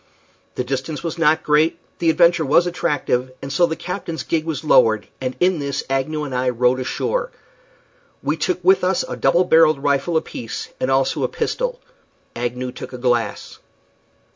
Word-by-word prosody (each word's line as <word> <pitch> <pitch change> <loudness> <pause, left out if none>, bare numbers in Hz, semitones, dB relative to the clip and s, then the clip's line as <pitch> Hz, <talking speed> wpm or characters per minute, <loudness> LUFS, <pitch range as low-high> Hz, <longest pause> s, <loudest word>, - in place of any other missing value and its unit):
The 125 - -1
distance 135 +5 -4
was 170 0 -4
not 160 0 +3
great, 150 +2 +2 0.2
the 165 - +2
adventure 170 0 +4
was 155 +5 +4
attractive, 145 -7 -1
and 135 0 -6
so 175 +4 +4
the 160 - -3
captain's 175 -2 -5
gig 160 -1 -1
was 160 -3 -3
lowered, 110 -8 +4 0.2
and 130 0 -3
in 180 -2 +2
this 140 -1 -3
Agnew 150 +3 -1
and 140 -3 -5
I 125 0 +1
rowed 125 +1 +2
ashore. - - -2 0.9
We 145 +3 0
took 170 +3 -2
with 190 +1 +4
us 185 0 +1
a - - -5
double 175 - +3
barrelled 160 -4 +4
rifle 145 +4 +1
apiece, 120 -7 -5
and 130 - -1
also 135 0 +1
a - - +2
pistol. - - -2 0.6
Agnew 125 +1 -3
took - - -9
a - - -5
glass. 120 -2 -1
150 Hz, 170 wpm, -20 LUFS, 130-170 Hz, 0.9 s, adventure